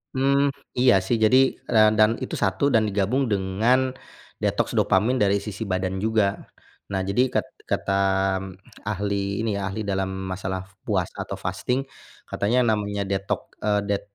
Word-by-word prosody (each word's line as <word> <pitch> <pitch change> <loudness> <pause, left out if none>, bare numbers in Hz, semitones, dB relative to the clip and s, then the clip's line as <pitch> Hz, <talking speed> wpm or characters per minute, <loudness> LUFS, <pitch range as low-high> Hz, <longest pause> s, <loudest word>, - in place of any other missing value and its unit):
Mmm, 140 +2 +3 0.3
iya, 125 -1 +6
sih. 115 +5 +1
Jadi, 120 +4 +6 0.3
ran 110 -1 +5
dan 110 0 +6
itu - - -4
1 95 +3 0
dan 110 -1 +4
digabung 105 +7 0
dengan 110 +6 +1 0.5
detoks - - 0
dopamin 115 +7 +2
dari 100 -1 +3
sisi 105 +1 -5
badan 95 0 -1
juga. 105 -1 0 0.4
Nah, 95 -1 0
jadi 100 +5 +1
kat - - +1 0.2
kata, 100 0 0 0.4
mmm, 95 0 -7 0.4
ahli 100 0 -1
ini 115 - 0
ya, 95 - -2
ahli 100 +3 -4
dalam 95 -2 -1 0.2
masalah 95 0 -3 0.2
puasa 95 -5 0 0.2
atau - - -4
fasting, 125 +2 -2 0.5
katanya 110 +5 +1
namanya 100 -1 -1
detok 95 0 -3
eee, 105 -1 +1
det 100 -1 0
100 Hz, 155 wpm, -24 LUFS, 95-110 Hz, 0.5 s, iya